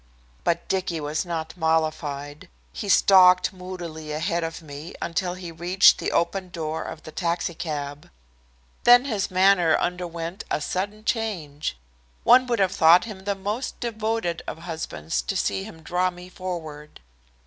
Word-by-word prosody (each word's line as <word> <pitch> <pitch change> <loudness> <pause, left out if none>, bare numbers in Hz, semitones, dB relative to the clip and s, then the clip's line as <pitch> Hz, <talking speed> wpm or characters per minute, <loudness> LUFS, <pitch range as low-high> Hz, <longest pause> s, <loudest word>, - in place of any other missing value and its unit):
But 170 0 0
Dicky 185 -3 -1
was 150 +4 -2
not 165 -1 -4
mollified. 155 -3 -1 0.2
He 200 - -5
stalked 185 -2 +6
moodily 175 -4 -7
ahead 170 +3 -1
of 165 +1 -5
me 150 +2 -9
until 175 +1 -2
he 180 -2 -7
reached 175 +3 +5
the - - -2
open 185 +2 0
door 160 -2 -4
of 155 - -8
the 155 - -9
taxicab. 155 -4 -3 0.7
Then 245 +2 +7
his 210 -7 -1
manner 185 -3 +4
underwent 175 +1 -3
a - - 0
sudden 205 +7 -3
change. 165 - -2 0.5
One 255 +1 +6
would 240 -1 +1
have 190 -3 +2
thought 165 +5 +6
him 195 -4 -9
the 200 -1 0
most 205 +6 -4
devoted 220 -6 -2
of - - -5
husbands 160 - -4
to - - -3
see 95 -1 -1
him 160 0 -12
draw 180 +2 +1
me 180 0 -11
forward. 160 -6 -7
175 Hz, 150 wpm, -24 LUFS, 160-190 Hz, 0.7 s, Then